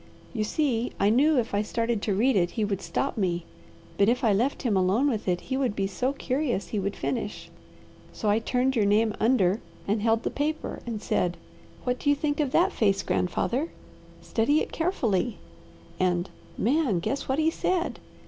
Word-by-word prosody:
"You 220 -4 0
see, 245 0 0
I 200 +1 +4
knew 285 +6 +4
if 235 -4 0
I 200 - +2
started 230 0 -1
to 205 -3 0
read 245 +6 +3
it 175 -3 +3
he 215 - +2
would 200 -2 -2
stop 175 +11 -2
me; 175 -3 0 0.5
but 200 +2 +5
if 250 +3 +1
I 220 -3 +4
left 245 +8 0
him 230 -6 +1
alone 190 +9 +3
with 225 -8 -1
it 180 -1 +1
he 260 - -3
would 255 -6 0
be 195 - 0
so 250 +7 -1
curious 270 -5 -2
he 210 - -1
would 200 +1 -2
finish. 225 -4 -4 0.6
So 215 - -4
I 205 +2 +4
turned 250 +3 0
your 215 -3 +3
name 215 +1 +3
under 215 -4 +3 0.3
and 205 +1 +1
held 225 +1 +2
the - - -1
paper 305 +2 -2
and 220 -3 -4
said, 180 -1 0 0.5
'What 250 0 -1
do 285 - 0
you 290 - +5
think 290 +1 -1
of 290 -4 +1
that 370 +6 +3
face, 200 -3 +2
grandfather? 250 - 0 0.5
Study 265 +7 +2
it - - -3
carefully,' 245 - 0 0.6
and, 180 -1 +1 0.3
Man, 290 +7 +2
only 190 -7 +1
guess 275 +10 -2
what 265 - +1
he 315 +1 +3
said! 350 +1 -1
230 Hz, 195 wpm, -27 LUFS, 200-270 Hz, 0.6 s, but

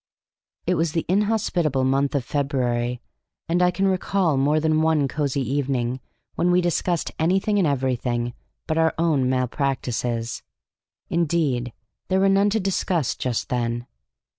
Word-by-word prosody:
It - - +2
was 165 -1 0
the 165 - -1
inhospitable 185 -8 +1
month 135 +2 +1
of 135 -4 0
February, 125 -4 -1 0.5
and 175 +2 +1
I 180 - +5
can 195 +2 0
recall 185 -3 +1
more 145 +3 +2
than 155 0 +2
one 160 -3 +2
cosy 140 -1 -1
evening 130 -2 -1 0.3
when 175 - +1
we 180 0 +4
discussed 175 -1 0
anything 190 +5 +2
and 180 - +3
everything 125 -3 -1 0.3
but 160 0 0
our 160 0 +2
own 155 -6 +2
malpractices; 125 -2 -1 0.7
indeed, 150 -8 0 0.4
there 190 - +2
were 195 0 +4
none 195 +1 +4
to 220 +2 +1
discuss 185 - 0
just 125 -3 -3
then. 120 -1 -1
145 Hz, 140 wpm, -23 LUFS, 130-175 Hz, 0.7 s, I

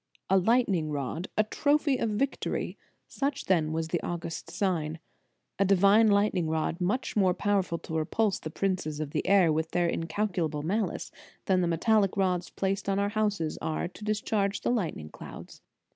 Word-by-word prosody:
A 195 - +6
lightning 195 -6 +2
rod, 145 +4 -3
a 215 - +5
trophy 285 +4 +1
of 230 - 0
victory; 260 +7 -2 0.3
such 280 0 -2
then 160 -5 +2
was 160 0 -2
the 170 0 -1
august 170 -1 -5
sign. 165 -6 -1 0.6
A - - +5
divine 200 +3 +5
lightning 200 -5 +2
rod, 160 +2 -1
much 205 +9 -1
more 190 -4 +3
powerful 195 -3 0
to 160 - -9
repulse 195 +6 0
the 155 - -6
princes 160 -4 -2
of 150 -2 -4
the - - -2
air 185 -5 +5
with 160 +1 -1
their 175 0 +1
incal 200 +5 -2
culable 155 -4 -1
malice, 205 +7 -2 0.3
than 185 -1 +3
the 175 - +1
metallic 200 +4 +2
rods 180 -2 +1
placed 195 0 -2
on 195 - +1
our 200 0 +1
houses 205 -7 -1
are 160 +2 -2
to 210 - -13
discharge 210 -1 0
the - - 0
lightning 170 - -2
clouds. - - -11
190 Hz, 175 wpm, -28 LUFS, 165-210 Hz, 0.6 s, A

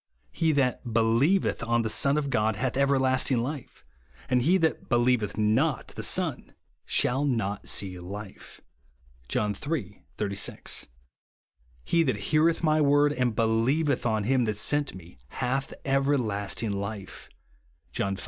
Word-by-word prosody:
He 165 -1 +1
that 125 -4 0
believeth 120 +12 +2
on 120 0 +1
the - - -1
Son 140 +5 +2
hath 125 -4 0
ever 140 0 +3
lasting 130 0 +2
life, 130 +3 -5 0.5
and 125 -1 +3
he 170 +9 +4
that 160 -3 -1
believeth 120 -4 +1
not 115 +7 +1
the - - -7
Son - - -1 0.3
shall 135 +3 +1
not 105 -7 -1
see 95 -2 -2
life," 100 +3 -9 0.7
(John 105 +10 -1 0.2
iii. 105 - -4
36). 100 -2 -2 0.5
" - - -36
He 170 - +2
that 140 -6 +1
heareth 160 +2 +3
my 155 -1 +3
word, 145 0 +4
and 125 -5 0
believeth 120 +6 +1
on 110 -2 0
him 125 +2 +2
that 105 -2 -2
sent 145 +4 0
me, 85 -7 -13
hath 130 - -2
everlasting 115 -7 0
life," 100 0 -6 0.6
(John 100 0 -1
V. - - -10
120 Hz, 140 wpm, -27 LUFS, 105-140 Hz, 0.7 s, he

